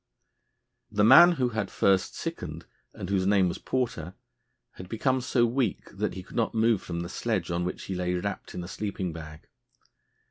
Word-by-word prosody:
The 105 -1 +1
man 170 +10 +9
who 130 -6 0
had 110 -1 -2
first 95 -1 +2
sickened, - - -5 0.3
and - - -7
whose 95 -1 +1
name 100 -2 +4
was 85 - -3
Porter, 105 -10 -2 0.6
had 90 - -11
become 130 +3 0
so 125 -1 +2
weak 120 -2 -2
that - - -2
he 95 - -6
could - - -14
not 115 -1 0
move 110 -2 +3
from 85 -2 -4
the 85 - -4
sledge 95 -2 -2
on 85 +1 -1
which 90 - -4
he 95 - -5
lay 90 0 -1
wrapped 100 +3 -4
in 90 - -4
a - - -7
sleeping 95 -3 -4
bag. 75 -1 -10
100 Hz, 185 wpm, -27 LUFS, 90-115 Hz, 0.6 s, man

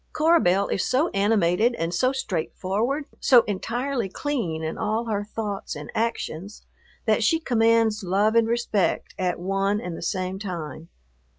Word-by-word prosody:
Cora 330 +2 +4
Belle 195 - +2
is 195 - 0
so 290 +7 +1
animated 205 +2 +2
and 165 -2 -2
so 255 +9 +2
straightforward, 225 - -2
so 250 -4 +6
entirely 235 +3 -2
clean 190 - -3
in 160 - -3
all 220 +2 -1
her 205 -3 -1
thoughts 205 -1 -5
and 145 0 -8
actions, 220 -4 -3 0.4
that - - +2
she 325 - +3
commands 230 -5 +2
love 200 +4 +2
and 230 -1 +4
respect 230 -4 0
at 180 -2 0
one 195 +3 0
and 180 -5 -5
the - - -8
same 185 +2 -2
time. 170 -5 -6
210 Hz, 155 wpm, -24 LUFS, 185-235 Hz, 0.4 s, so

